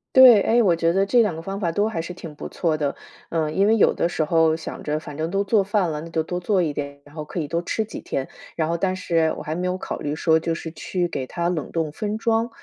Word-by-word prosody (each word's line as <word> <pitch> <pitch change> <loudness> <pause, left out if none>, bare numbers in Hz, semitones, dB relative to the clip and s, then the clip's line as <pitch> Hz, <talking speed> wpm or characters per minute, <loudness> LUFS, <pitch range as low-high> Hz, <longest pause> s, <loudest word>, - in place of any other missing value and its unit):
对， 255 -4 +10
诶， 235 +1 +4
我 180 -5 +4
觉 165 0 +2
得 195 +1 +3
这 240 +4 +4
2 200 -7 +1
个 165 - -6
方 195 +3 -5
法 170 -4 -1
都 205 +4 +1
还 170 -7 -3
是 180 - -6
挺 170 -4 -9
不 - - -7
错 160 -3 -1
的， 145 -2 -1 0.3
呃， 160 -2 -1
因 195 +6 +2
为 225 - +5
有 220 - +4
的 - - 0
时 165 -2 -1
候 160 0 +3
想 160 - -7
着 150 0 -1
反 150 -1 -8
正 160 +1 -2
都 195 +2 0
做 200 +1 +3
饭 195 -4 +1
了， 150 - -3
那 165 +2 -8
就 160 -1 0
多 180 +2 -3
做 185 +1 +1
一 155 -3 0
点， 140 0 -6
然 145 - -18
后 155 -1 -6
可 165 - -9
以 145 - -5
多 170 +1 0
吃 220 +5 -1
几 215 - -8
天。 135 - -4 0.3
然 160 -1 0
后 170 - 0
但 185 +1 0
是 165 -3 +1
我 - - -6
还 155 +1 -3
没 180 +1 -2
有 180 - -1
考 - - -5
虑 145 0 -3
说 160 0 +3
就 165 0 -2
是 165 -1 -6
去 175 +2 -2
给 130 -5 -4
它 170 +4 -1
冷 160 -5 -3
冻 160 -3 -1
分 210 +5 -3
装， 230 +1 +1
170 Hz, 310 characters per minute, -23 LUFS, 155-195 Hz, 0.3 s, 对